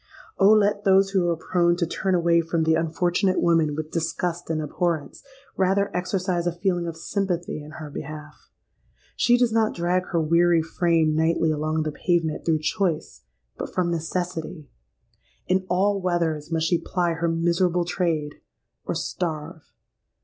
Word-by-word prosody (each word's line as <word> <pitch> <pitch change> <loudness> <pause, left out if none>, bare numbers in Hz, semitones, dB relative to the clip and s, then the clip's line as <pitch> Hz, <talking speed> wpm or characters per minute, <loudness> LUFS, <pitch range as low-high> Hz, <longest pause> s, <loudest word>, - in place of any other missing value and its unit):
Oh! 195 - +6
let 205 -1 +3
those 195 0 +4
who 190 -3 +2
are 170 - +1
prone 175 +1 +1
to 175 -1 0
turn 190 +3 -1
away 170 -1 +3
from 165 0 -1
the 160 0 +3
unfortunate 175 +3 +1
woman 165 -3 +2
with 155 0 -5
disgust 170 +1 -2
and 160 -1 0
abhorrence, 155 -1 -2 0.3
rather 195 +1 +1
exercise 180 -1 -1
a - - +2
feeling 175 0 -1
of 165 -1 -5
sympathy 175 -3 -2
in 150 +1 -11
her 155 -3 -8
behalf. 150 +1 -9 0.7
She 245 0 +4
does 245 -2 +2
not 225 -1 +2
drag 180 +1 0
her 170 - 0
weary 170 +1 +3
frame 165 -2 +1
nightly 160 0 +2
along 155 +1 -1
the 155 - -2
pavement, 165 -1 -1
through 160 -2 +1
choice, 170 - -1 0.4
but - - -6
from 175 -2 +1
necessity. 165 -1 -4 0.8
In 185 0 0
all 195 +2 +1
weathers 170 -4 -1
must 160 -1 0
she 170 +1 +2
ply 175 -2 -1
her 165 +1 -1
miserable 170 +1 +1
trade—or 165 -4 -4
starve. 160 -2 -4
170 Hz, 155 wpm, -24 LUFS, 160-180 Hz, 0.8 s, Oh